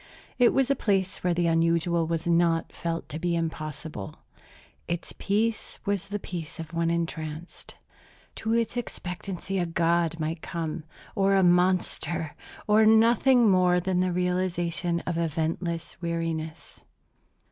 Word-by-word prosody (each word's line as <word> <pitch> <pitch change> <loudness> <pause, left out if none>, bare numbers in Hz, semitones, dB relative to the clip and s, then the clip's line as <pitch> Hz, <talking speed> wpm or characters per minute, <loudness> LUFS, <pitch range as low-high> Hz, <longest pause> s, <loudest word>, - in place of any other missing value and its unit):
It 245 - +6
was 270 0 +2
a - - +3
place 195 -6 0
where 175 -1 +2
the 175 0 +1
unusual 165 0 +2
was 165 +1 -2
not 170 -1 +2
felt 165 -1 -3
to 155 - -5
be 175 0 0
impossible. 155 - -4 0.7
Its 170 0 -4
peace 215 +2 -1
was 195 -1 -1
the 205 +1 -3
peace 175 -4 -7
of 165 0 -7
one 165 0 +1
entranced. 165 -1 -4 0.6
To 220 - -2
its 230 +1 +1
expectancy 195 -4 -4
a 175 - 0
god 165 0 +1
might 160 +1 -2
come, 165 -3 -4 0.3
or 195 0 +3
a 190 - +4
monster, 180 -2 +1 0.3
or 215 +1 +5
nothing 230 +3 +5
more 180 -1 +4
than 180 0 0
the 185 0 +1
realization 175 -1 0
of 170 -2 -2
eventless 165 +1 -2
weariness. 165 -2 -4
175 Hz, 135 wpm, -27 LUFS, 165-190 Hz, 0.7 s, It